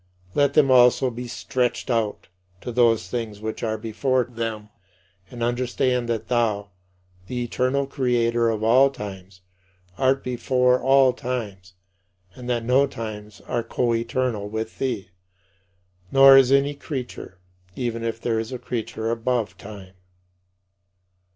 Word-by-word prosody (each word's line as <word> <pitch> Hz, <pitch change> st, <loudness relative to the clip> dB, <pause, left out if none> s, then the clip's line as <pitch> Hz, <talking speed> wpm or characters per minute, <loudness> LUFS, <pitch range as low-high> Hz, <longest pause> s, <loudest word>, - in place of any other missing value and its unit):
Let 140 Hz, -1 st, +2 dB
them 145 Hz, -4 st, +5 dB
also 125 Hz, +1 st, +5 dB
be 120 Hz, +1 st, -7 dB
stretched 125 Hz, +1 st, -2 dB
out 115 Hz, -3 st, -1 dB, 0.3 s
to 125 Hz, -, -5 dB
those 115 Hz, -6 st, +2 dB
things 110 Hz, 0 st, -4 dB
which 110 Hz, +1 st, -5 dB
are 110 Hz, -1 st, -1 dB
before 125 Hz, +4 st, 0 dB
them, 115 Hz, -3 st, -5 dB, 0.6 s
and 120 Hz, -1 st, -6 dB
understand 125 Hz, 0 st, 0 dB
that 110 Hz, -2 st, -2 dB
thou, 110 Hz, -4 st, 0 dB, 0.6 s
the 125 Hz, -1 st, -3 dB
eternal 130 Hz, +3 st, 0 dB
Creator 120 Hz, -3 st, +1 dB
of 110 Hz, -1 st, -2 dB
all 130 Hz, +5 st, +5 dB
times, 95 Hz, -6 st, -9 dB, 0.6 s
art 135 Hz, +1 st, +2 dB
before 125 Hz, 0 st, +1 dB
all 135 Hz, 0 st, +4 dB
times 105 Hz, -8 st, -5 dB, 0.6 s
and 125 Hz, -1 st, -9 dB
that 120 Hz, -2 st, -1 dB
no 130 Hz, +3 st, +4 dB
times 105 Hz, -5 st, -8 dB
are 120 Hz, -, -2 dB
coeternal 115 Hz, -2 st, -1 dB
with 110 Hz, +1 st, -5 dB
thee; 115 Hz, -8 st, -3 dB, 1.0 s
nor 135 Hz, 0 st, +8 dB
is 135 Hz, -1 st, +6 dB
any 140 Hz, +1 st, +3 dB
creature, 135 Hz, -, -7 dB, 0.4 s
even 115 Hz, -2 st, -3 dB
if 115 Hz, 0 st, -3 dB
there 115 Hz, -1 st, -1 dB
is 110 Hz, +2 st, -5 dB
a 130 Hz, -, -4 dB
creature 115 Hz, -2 st, -4 dB
"above 115 Hz, -1 st, -1 dB
time." 100 Hz, -3 st, -11 dB
120 Hz, 130 wpm, -23 LUFS, 110-125 Hz, 1.0 s, nor